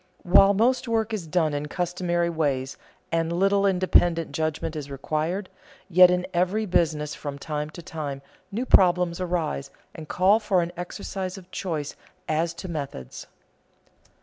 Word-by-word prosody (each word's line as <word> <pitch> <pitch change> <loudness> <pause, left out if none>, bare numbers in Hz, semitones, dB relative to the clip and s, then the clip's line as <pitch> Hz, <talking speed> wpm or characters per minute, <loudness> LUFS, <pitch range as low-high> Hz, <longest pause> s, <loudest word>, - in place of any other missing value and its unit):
While 195 +3 +6
most 245 +5 +2
work 225 -1 0
is 190 -7 -3
done 160 -2 +1
in 145 +1 -3
customary 175 0 -1
ways 140 -5 -1 0.4
and 165 0 0
little 195 +3 +3
independent 175 -3 +2
judgment 160 0 -2
is 145 -2 -5
required, 155 +7 -2 0.4
yet 180 +1 +8
in 180 0 +1
every 185 +5 +1
business 155 -5 0
from 145 -1 -6
time 150 0 -4
to 170 +2 -11
time 145 -4 -5 0.3
new 230 +6 -2
problems 180 -4 +4
arise 165 -6 -2 0.2
and 155 -1 -9
call 195 +4 +4
for 195 -5 +1
an 170 - -5
exercise 185 +1 -5
of 185 -1 -14
choice 155 -6 -4 0.3
as 165 +2 0
to 175 - -7
methods. 140 - -6
170 Hz, 150 wpm, -25 LUFS, 155-185 Hz, 0.4 s, yet